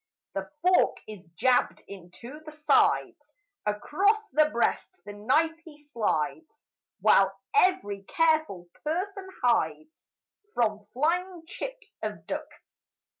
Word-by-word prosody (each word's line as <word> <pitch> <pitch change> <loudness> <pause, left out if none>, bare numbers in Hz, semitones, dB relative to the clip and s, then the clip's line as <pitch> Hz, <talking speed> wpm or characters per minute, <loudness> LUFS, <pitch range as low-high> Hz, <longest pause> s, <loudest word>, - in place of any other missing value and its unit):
The 195 0 -4
fork 365 0 +4
is 210 -4 -9
jabbed 250 +4 +2
into 200 - -11
the 310 - -9
sides 415 +8 +1 0.3
Across 400 - +1
the 305 -3 +3
breast 235 -5 0 0.2
the 205 - -7
knife 310 +11 +1
he 315 -3 -13
slides 290 - -3 0.4
While 195 0 +4
every 365 - +2
careful 315 - +1 0.2
person 380 +5 -3
hides 235 - 0 0.4
From 215 -3 0
flying 345 +5 0
chips 485 +3 -8
of - - -5
duck. - - -4
300 Hz, 110 wpm, -28 LUFS, -, 0.4 s, fork